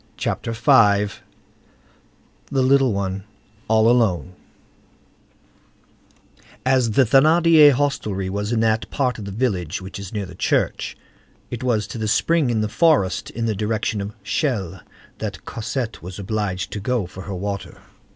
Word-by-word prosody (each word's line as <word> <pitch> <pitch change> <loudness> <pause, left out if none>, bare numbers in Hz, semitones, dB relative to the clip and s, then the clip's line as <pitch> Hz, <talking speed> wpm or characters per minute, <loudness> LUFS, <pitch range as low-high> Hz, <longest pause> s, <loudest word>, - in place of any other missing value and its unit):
CHAPTER 115 - -2
V—THE 105 -3 +4 1.4
LITTLE 135 -1 +3
ONE 100 -1 -3 0.4
ALL 110 0 +4
ALONE 110 -7 +2 2.3
As 130 -2 +3
the 135 - +5
Thénardier 155 +4 +6
hostelry 110 -9 -1
was 105 +3 -3
in 115 -2 +1
that 110 0 +1
part 125 -5 -1
of 105 - -7
the 100 - -6
village 95 - -1
which 95 +1 -8
is 100 -2 -8
near 105 -2 -3
the 90 - -11
church, 90 - -1 0.5
it 120 - -5
was 115 -5 +1
to 115 - -7
the 110 - -2
spring 145 +5 +2
in 115 -2 +1
the 105 - 0
forest 105 - +2
in 115 0 -3
the 110 - 0
direction 105 0 -1
of 100 +3 -6
Chelles 115 - -2 0.4
that - - -6
Cosette 115 +1 -4
was 90 +2 -8
obliged 100 -2 -3
to 105 - -4
go 115 0 -1
for 95 +2 -10
her 100 - -5
water. 100 +1 -5
110 Hz, 145 wpm, -21 LUFS, 100-125 Hz, 2.3 s, Thénardier